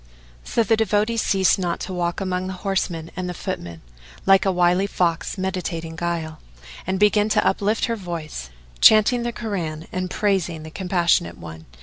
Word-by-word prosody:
"[FN#444] -, -, -17 dB
So 230 Hz, -, +2 dB
the 225 Hz, 0 st, +2 dB
devotee 215 Hz, +1 st, +1 dB
ceased 190 Hz, -4 st, +3 dB
not 175 Hz, -2 st, -1 dB
to 190 Hz, -, -5 dB
walk 175 Hz, -1 st, -1 dB
among 185 Hz, -1 st, -2 dB
the 190 Hz, -, -4 dB
horsemen 180 Hz, -4 st, -2 dB
and 185 Hz, -1 st, -3 dB
the 180 Hz, -, -5 dB
footmen, 85 Hz, -, -5 dB, 0.4 s
like 195 Hz, +1 st, +5 dB
a -, -, +4 dB
wily 180 Hz, +2 st, +2 dB
fox 175 Hz, -2 st, -1 dB
meditating 175 Hz, -4 st, -3 dB
guile, 165 Hz, -2 st, -3 dB, 0.5 s
and 190 Hz, 0 st, -1 dB
began 210 Hz, +1 st, +4 dB
to -, -, +2 dB
uplift 210 Hz, +2 st, +1 dB
her 230 Hz, -, -1 dB
voice, 165 Hz, -, -6 dB, 0.3 s
chanting 220 Hz, +3 st, +6 dB
the 240 Hz, 0 st, -2 dB
Koran 170 Hz, -9 st, -4 dB
and 185 Hz, 0 st, -3 dB
praising 180 Hz, -6 st, 0 dB
the 160 Hz, -, -9 dB
Compassionate 175 Hz, -, +1 dB
One. 80 Hz, -1 st, -10 dB
185 Hz, 175 wpm, -22 LUFS, 170-200 Hz, 0.5 s, chanting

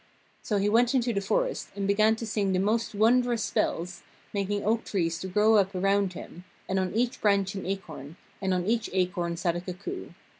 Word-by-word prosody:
So 210 Hz, -, -1 dB
he 200 Hz, +1 st, +1 dB
went 235 Hz, +4 st, +3 dB
into 240 Hz, -2 st, +1 dB
the 200 Hz, -, 0 dB
forest -, -, -1 dB
and 200 Hz, -1 st, -2 dB
began 215 Hz, +2 st, +4 dB
to 230 Hz, -, -6 dB
sing 205 Hz, -3 st, 0 dB
the 185 Hz, -, +2 dB
most 215 Hz, +2 st, 0 dB
wondrous 235 Hz, +1 st, +3 dB
spells, 175 Hz, +1 st, -1 dB, 0.3 s
making 200 Hz, 0 st, -1 dB
oak 225 Hz, +2 st, +1 dB
trees 165 Hz, -4 st, -1 dB
to 190 Hz, -, -5 dB
grow 210 Hz, +4 st, +4 dB
up 195 Hz, -1 st, +1 dB
around 195 Hz, 0 st, +1 dB
him, 175 Hz, 0 st, -10 dB, 0.2 s
and 190 Hz, 0 st, 0 dB
on 185 Hz, +1 st, -2 dB
each 245 Hz, +2 st, 0 dB
branch 200 Hz, -2 st, +2 dB
an 195 Hz, -2 st, -5 dB
acorn, 165 Hz, -6 st, -6 dB, 0.3 s
and 190 Hz, -1 st, 0 dB
on 180 Hz, -1 st, 0 dB
each 225 Hz, +1 st, 0 dB
acorn 180 Hz, -2 st, 0 dB
sat 175 Hz, -1 st, 0 dB
a 175 Hz, -, -3 dB
cuckoo. 185 Hz, -, -6 dB
200 Hz, 200 wpm, -27 LUFS, 185-220 Hz, 0.3 s, began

